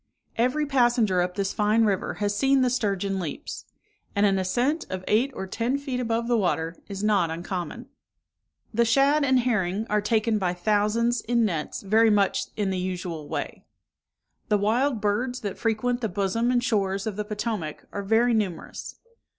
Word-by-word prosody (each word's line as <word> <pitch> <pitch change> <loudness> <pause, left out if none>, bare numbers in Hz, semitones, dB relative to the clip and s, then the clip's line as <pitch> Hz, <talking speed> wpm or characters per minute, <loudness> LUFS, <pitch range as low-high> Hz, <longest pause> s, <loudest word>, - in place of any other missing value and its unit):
Every 255 +6 +1
passenger 240 -8 +3
up 180 0 -2
this 195 -1 -1
fine 215 +1 +3
river 200 -3 -1
has 205 0 -1
seen 270 +4 +3
the 250 -1 +2
sturgeon 200 -5 -1
leaps; 165 -5 -6 0.5
and 200 +1 +3
an 195 -1 +3
ascent 245 - 0
of 185 0 -5
eight 235 +6 +3
or 190 - -4
ten 230 +7 -1
feet 275 -3 -4
above 230 -1 -1
the 240 -2 +2
water 165 -3 0
is 200 0 -6
not 200 -6 +3
uncommon. 175 +6 -5 0.9
The 235 +2 +3
shad 275 +6 +3
and 260 -2 +3
herring 215 -4 0
are 210 0 +3
taken 215 +1 +1
by 180 -2 0
thousands, 215 +5 +1
in 235 0 +1
nets, 165 -7 -3
very 220 +3 +4
much 200 -1 +2
in 200 -2 0
the 185 - -1
usual 175 -4 -4
way. - - -4 0.9
The 210 - +4
wild 230 +4 +1
birds 240 +5 -1
that 200 -4 -5
frequent 240 +2 0
the 225 - -1
bosom 200 +5 0
and 245 -1 +2
shores 200 -4 0
of 215 -3 -3
the 210 - -2
Potomac, 210 -6 -4
are 200 - -3
very 225 +4 +3
numerous. 195 -7 -3
210 Hz, 175 wpm, -25 LUFS, 195-240 Hz, 0.9 s, very